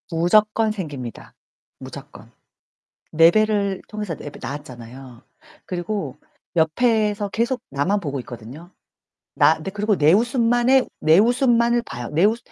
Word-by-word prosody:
무조건 215 Hz, +5 st, +2 dB
생깁니다, 145 Hz, -, -7 dB, 0.4 s
무조건. -, -, -12 dB, 0.8 s
내 165 Hz, +2 st, +6 dB
배를 205 Hz, -2 st, 0 dB
통해서 210 Hz, -6 st, -5 dB
내가 145 Hz, -, -10 dB
낳았잖아요. 125 Hz, -2 st, -9 dB, 0.4 s
그리고 190 Hz, +3 st, -4 dB, 0.4 s
옆에서 210 Hz, +4 st, +1 dB
계속 235 Hz, +5 st, -1 dB
나만 145 Hz, +10 st, 0 dB
보고 140 Hz, -6 st, -4 dB
있거든요. 125 Hz, +9 st, -11 dB, 0.7 s
나 -, -, +4 dB
근데 195 Hz, -, -6 dB
그리고 210 Hz, 0 st, 0 dB
내 150 Hz, +2 st, +4 dB
웃음만의, 240 Hz, +3 st, +2 dB
내 160 Hz, +3 st, +5 dB
웃음만을 235 Hz, 0 st, +3 dB
봐요. 120 Hz, -, -7 dB
내 165 Hz, +6 st, +2 dB
웃 225 Hz, +3 st, +2 dB
200 Hz, 285 characters per minute, -21 LUFS, 150-220 Hz, 0.8 s, 내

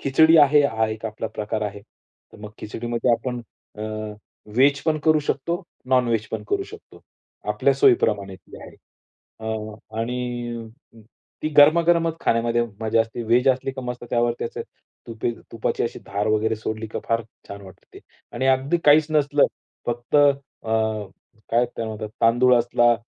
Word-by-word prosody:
खिचडी 160 Hz, +4 st, +5 dB
आहे 145 Hz, +1 st, +4 dB, 0.2 s
हा 110 Hz, -, +2 dB
एक 110 Hz, +1 st, -6 dB
आपला 110 Hz, +1 st, -5 dB
प्रकार 110 Hz, 0 st, -3 dB
आहे. 100 Hz, -1 st, -4 dB, 0.5 s
तर -, -, -15 dB
मग 105 Hz, -, -8 dB
खिचडीमध्ये 120 Hz, +2 st, -2 dB
आपण 125 Hz, +1 st, -2 dB, 0.4 s
अ, -, -, -4 dB, 0.7 s
व्हेज 140 Hz, +2 st, +4 dB
पण 155 Hz, -1 st, +1 dB
करू 155 Hz, -1 st, +5 dB
शकतो. 170 Hz, +7 st, -2 dB, 0.3 s
नॉन 125 Hz, -2 st, +3 dB
वेज 110 Hz, -2 st, 0 dB
पण -, -, -4 dB
करू 400 Hz, -1 st, 0 dB
शकतो. 440 Hz, -, -14 dB, 0.5 s
आपल्या -, -, +2 dB
सोयीप्रमाणे 105 Hz, -, +2 dB
ती 95 Hz, -, -15 dB
आहे. -, -, -11 dB, 0.7 s
अ, 110 Hz, -1 st, -4 dB, 0.3 s
आणि 120 Hz, -1 st, -4 dB, 0.8 s
ती 155 Hz, -, 0 dB
गरमागरमच 165 Hz, +2 st, +5 dB
खाण्यामध्ये 115 Hz, +1 st, +1 dB, 0.2 s
मजा 110 Hz, 0 st, +2 dB
असते. 115 Hz, +1 st, -3 dB
व्हेज 125 Hz, +4 st, +3 dB
असली 130 Hz, +1 st, +1 dB
तर -, -, -4 dB
मस्त 125 Hz, 0 st, -5 dB
त्यावरती 120 Hz, 0 st, 0 dB
अशी -, -, -5 dB, 0.9 s
तुपाची 115 Hz, -, -1 dB
अशी 115 Hz, -, -3 dB
धार 100 Hz, +1 st, -2 dB
वगैरे 110 Hz, +1 st, +1 dB
सोडली 110 Hz, +1 st, -4 dB
तर -, -, -1 dB
फार 115 Hz, 0 st, +1 dB, 0.3 s
छान 100 Hz, 0 st, -8 dB
वाटते 95 Hz, -2 st, -15 dB
ते, -, -, -11 dB, 0.4 s
आणि 130 Hz, +2 st, 0 dB
अगदी 135 Hz, +5 st, +2 dB
काहीच 150 Hz, +1 st, +6 dB
नसलं 145 Hz, -1 st, +3 dB, 0.4 s
फक्त 120 Hz, +4 st, -1 dB
अ, 140 Hz, -5 st, +1 dB, 0.8 s
काय 120 Hz, +2 st, +3 dB
त्याला 115 Hz, -1 st, -6 dB
म्हणतात 110 Hz, 0 st, -5 dB
तांदूळ 120 Hz, +2 st, +5 dB
असला, 120 Hz, 0 st, +3 dB
120 Hz, 155 wpm, -23 LUFS, 110-140 Hz, 0.9 s, काहीच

